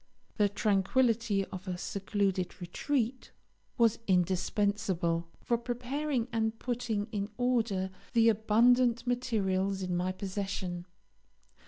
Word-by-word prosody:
The 205 Hz, -2 st, +4 dB
tranquillity 210 Hz, +1 st, +2 dB
of 190 Hz, +1 st, -9 dB
a 180 Hz, -1 st, -2 dB
secluded 195 Hz, -1 st, -1 dB
retreat 240 Hz, +8 st, -2 dB, 0.5 s
was 230 Hz, -2 st, +3 dB
indispensable 185 Hz, -2 st, +1 dB, 0.2 s
for 235 Hz, -1 st, +1 dB
preparing 250 Hz, +2 st, -2 dB
and 220 Hz, 0 st, 0 dB
putting 235 Hz, -4 st, -2 dB
in 205 Hz, -2 st, -2 dB
order 230 Hz, -7 st, +1 dB, 0.2 s
the 230 Hz, -1 st, +5 dB
abundant 235 Hz, +3 st, +4 dB
materials 200 Hz, -6 st, 0 dB
in 180 Hz, -1 st, -1 dB
my 180 Hz, +1 st, 0 dB
possession. 190 Hz, -2 st, -4 dB
210 Hz, 105 wpm, -31 LUFS, 190-235 Hz, 0.5 s, the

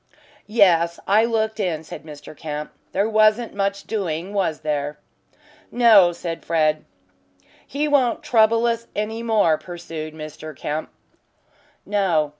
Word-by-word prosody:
"Yes, 175 Hz, -6 st, +3 dB
I 215 Hz, +3 st, +4 dB
looked 220 Hz, -1 st, -1 dB
in," 170 Hz, -6 st, -1 dB
said 160 Hz, -, -9 dB
Mr. 150 Hz, 0 st, -11 dB
Kemp. 150 Hz, 0 st, -6 dB, 0.2 s
"There 200 Hz, +3 st, +1 dB
wasn't 215 Hz, +1 st, +3 dB
much 200 Hz, 0 st, -1 dB
doing, 185 Hz, -3 st, -3 dB
was 185 Hz, -6 st, -1 dB
there?" 150 Hz, -1 st, -2 dB, 0.7 s
"No," 220 Hz, -7 st, +6 dB
said 170 Hz, -1 st, -6 dB
Fred. 155 Hz, -2 st, +1 dB, 0.8 s
"He 290 Hz, +2 st, -1 dB
won't 270 Hz, -5 st, +2 dB
trouble 230 Hz, 0 st, +3 dB
us 230 Hz, 0 st, -1 dB
any 220 Hz, +2 st, -3 dB
more," 210 Hz, -9 st, +2 dB
pursued 165 Hz, -3 st, -7 dB
Mr. 155 Hz, 0 st, -8 dB
Kemp. 150 Hz, +4 st, -4 dB, 1.0 s
"No." 180 Hz, -7 st, +1 dB
190 Hz, 125 wpm, -22 LUFS, 155-220 Hz, 1.0 s, No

